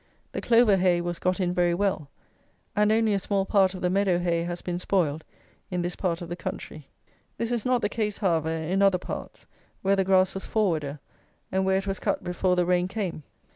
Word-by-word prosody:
The - - -4
clover 230 -4 +5
hay 180 -2 +3
was 175 0 -3
got 185 +2 0
in 180 -1 0
very 175 -1 +2
well; 185 -7 -1 0.7
and 210 0 +3
only 220 -1 +3
a 200 - +1
small 195 0 0
part 195 -2 +3
of 185 - -7
the 180 - +2
meadow 195 -2 +2
hay 170 -1 0
has 175 +1 -4
been 175 -1 -3
spoiled 160 -5 0 0.5
in 180 -1 -2
this 175 0 -3
part 175 -2 -2
of 170 - -8
the 175 - -3
country. 155 -3 -7 0.5
This 230 0 -2
is 235 -3 -1
not 250 -2 +1
the - - +3
case, 210 -1 -2
however, 165 -6 +1
in 165 +4 -1
other 195 -2 +5
parts, - - -7 0.4
where 195 +1 +3
the 195 - +2
grass 190 -1 +3
was 195 - -6
forwarder, 160 -9 0 0.5
and 190 0 +1
where 190 0 +3
it 195 - -2
was 195 -1 -2
cut - - -1
before 180 +1 0
the 180 -1 +2
rain 180 0 +2
came. 190 -5 -4
185 Hz, 215 wpm, -26 LUFS, 175-200 Hz, 0.7 s, clover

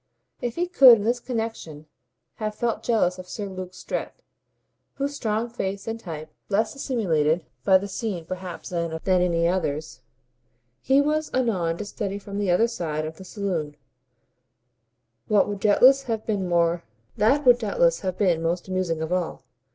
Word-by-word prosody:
If 240 -1 -3
he 350 - 0
could 270 -9 +8
in 205 - -4
this 240 +3 +1
connexion 225 - -5 0.5
have 215 -1 -3
felt 235 0 -1
jealous 185 -6 +1
of 180 0 -10
Sir 205 - -4
Luke 185 -1 -7
Strett, - - -5 0.7
whose 280 +1 -2
strong 220 -2 -1
face 195 -4 -4
and 225 0 -3
type, 155 -6 -7 0.2
less 215 +2 +1
assimilated 170 - 0 0.2
by 190 +5 +6
the 200 +2 -5
scene 195 -4 -4
perhaps 185 +1 -7
than 170 -2 -2
any 180 -3 +2
others, 155 -6 -2 0.8
he 270 +1 +4
was 305 +1 0
anon 185 -10 0
to 210 - -5
study 200 -1 -4
from 200 0 -6
the 200 -2 0
other 180 +7 +4
side 155 -9 -3
of 155 0 -7
the 190 - -10
saloon, 175 -7 -3 1.5
that 205 -2 +4
would 205 -1 -4
doubtless 250 +7 +6
have 225 -4 -3
been 200 -4 -1 0.7
most 190 - +2
amusing 185 -4 -1
of 160 +3 -2
all. 180 -2 -2
195 Hz, 145 wpm, -25 LUFS, 170-225 Hz, 1.5 s, could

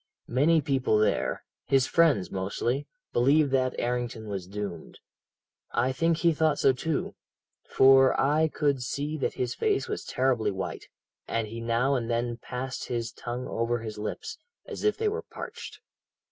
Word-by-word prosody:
Many 155 +5 +4
people 135 -6 +1
there 105 -1 +1 0.2
his 135 -2 +4
friends, 150 - +3
mostly 115 +8 -2 0.3
believed 140 +4 +4
that 130 -1 +1
Errington 120 -2 -2
was 95 -3 -4
doomed. 100 -4 -6 0.8
I 125 +2 +2
think 165 +5 +1
he 170 0 +3
thought 155 -1 +2
so, 135 - +4
too, 155 +4 -2 0.6
for 135 0 +6
I 150 +4 +3
could 145 -4 0
see 140 +5 -3
that - - -1
his 125 -1 -1
face 420 -2 0
was 425 - -4
terribly 125 -4 +1
white, 95 -1 -4 0.4
and 115 -1 -1
he 115 +2 -7
now 120 +4 +1
and 120 -3 -1
then 120 0 -1
passed 130 +2 -5
his 115 -2 -2
tongue 120 +1 -5
over 115 +1 0
his 110 -2 -7
lips, 110 - -5 0.3
as - - -7
if 425 0 +2
they 440 0 0
were 440 +2 -1
parched. - - -9
125 Hz, 160 wpm, -28 LUFS, 115-145 Hz, 0.8 s, for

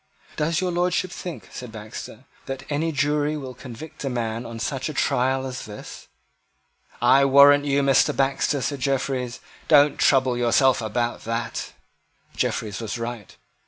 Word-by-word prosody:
"Does 160 +3 0
your 185 -1 0
Lordship 180 +1 0
think," 180 -3 -7
said 125 -2 -8
Baxter, 110 +2 -9 0.2
"that 135 0 -5
any 160 +3 0
jury 150 +1 0
will 130 -3 -7
convict 130 +6 -10
a 135 - -1
man 115 -1 -3
on 115 0 -7
such 130 +6 -3
a 150 - -6
trial 130 +1 +1
as 130 -1 -6
this?" 105 -1 -10 1.0
"I 140 - +6
warrant 140 +1 +7
you, 140 0 +2
Mr. 135 -1 +4
Baxter," 135 +1 +1
said 140 -2 -2
Jeffreys: 130 -2 -2 0.3
"don't 145 -1 +5
trouble 130 -2 +3
yourself 120 +2 +3
about 120 +2 -2
that." 115 +1 -3 0.6
Jeffreys 105 -3 -2
was 115 +1 -4
right. 115 -3 -6
135 Hz, 150 wpm, -24 LUFS, 120-145 Hz, 1.0 s, warrant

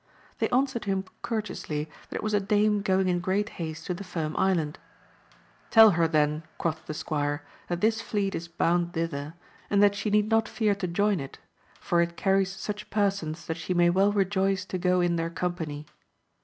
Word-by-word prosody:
They - - +1
answered 255 -2 +1
him 195 -1 -1 0.2
courteously, 205 -9 -3 0.2
that - - -7
it - - -3
was 215 0 -1
a 205 - +4
dame 210 +1 +2
going 190 -2 +2
in 175 -1 +1
great 195 +4 0
haste 160 0 -5
to 180 - -2
the 180 - -6
Firm 160 -4 -4
Island: 165 -5 +1 0.9
Tell 225 -2 +8
her 170 -2 +2
then, 150 -1 +1 0.2
quoth 160 -1 -3
the 155 - -4
squire, 145 -1 -2 0.2
that 175 0 -3
this 220 +1 +2
fleet 205 -3 -1
is 170 - -4
bound 175 +1 0
thither, 160 -2 -3 0.3
and 205 0 +4
that 205 -1 +5
she 200 +1 -2
need 210 0 +3
not 225 0 +3
fear 215 -3 +1
to 195 -2 -3
join 200 +2 +1
it; 135 -1 -7 0.4
for 170 -1 +1
it 170 0 -2
carries 195 -1 +2
such 205 +2 -6
persons 195 -6 -1
that 160 +1 -3
she 180 +2 -3
may 175 0 +5
well 195 +3 +3
rejoice 195 -1 +1
to 185 - -4
go 180 0 +2
in 175 -1 +1
their 165 0 -1
company. 165 -4 -4
185 Hz, 195 wpm, -27 LUFS, 165-205 Hz, 0.9 s, Tell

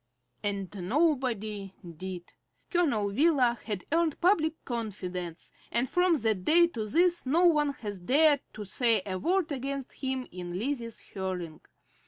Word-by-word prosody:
And 200 -1 -3
nobody 225 - 0
did. 175 +1 -7 0.4
Colonel 280 - +1
Wheeler 255 -2 +3
had 210 -4 -3
earned 330 -1 +1
public 325 -4 +2
confidence, 185 -7 -5 0.2
and 240 +2 +3
from 355 +4 +3
that 220 -8 0
day 340 - +6
to 220 -9 -4
this 345 - +3
no 335 +7 +4
one 300 -4 +4
has 205 -6 -6
dared 285 - +4
to 210 -1 -7
say 225 0 +2
a 185 -2 -3
word 355 - +1
against 275 0 -4
him 260 -1 -1
in 175 0 -6
Lizzie's 235 0 -3
hearing. 180 -5 -5
235 Hz, 140 wpm, -29 LUFS, 195-305 Hz, 0.4 s, day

